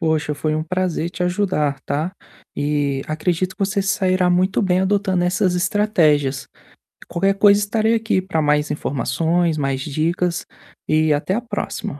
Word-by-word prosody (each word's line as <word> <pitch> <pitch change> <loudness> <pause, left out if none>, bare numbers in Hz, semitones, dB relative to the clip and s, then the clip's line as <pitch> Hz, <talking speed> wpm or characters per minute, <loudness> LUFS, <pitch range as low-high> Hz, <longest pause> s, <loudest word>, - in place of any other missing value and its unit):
Poxa, 160 -2 0
foi 155 +2 -1
um 155 - -1
prazer 180 -1 -2
te 180 +1 -5
ajudar, 180 -6 0
tá? 155 +6 -2 0.4
E 145 -2 -1
acredito 180 +4 -1
que 200 - 0
você 200 0 -1
se 195 - -2
sairá 185 -2 +2
muito 185 +4 +2
bem 185 -2 +2
adotando 190 -2 +1
essas 180 0 +1
estratégias. 175 - +1 0.6
Qualquer 195 +3 +1
coisa, 200 0 +5
estarei 220 +2 +1
aqui 220 -4 0
para 185 -4 -1
mais 150 0 +1
informações, 160 +5 0
mais 135 -2 -1
dicas, 165 +4 -1 0.4
e 155 0 +2
até 150 +6 -1
a 240 - -1
próxima! 205 - -5
175 Hz, 155 wpm, -20 LUFS, 150-190 Hz, 0.6 s, coisa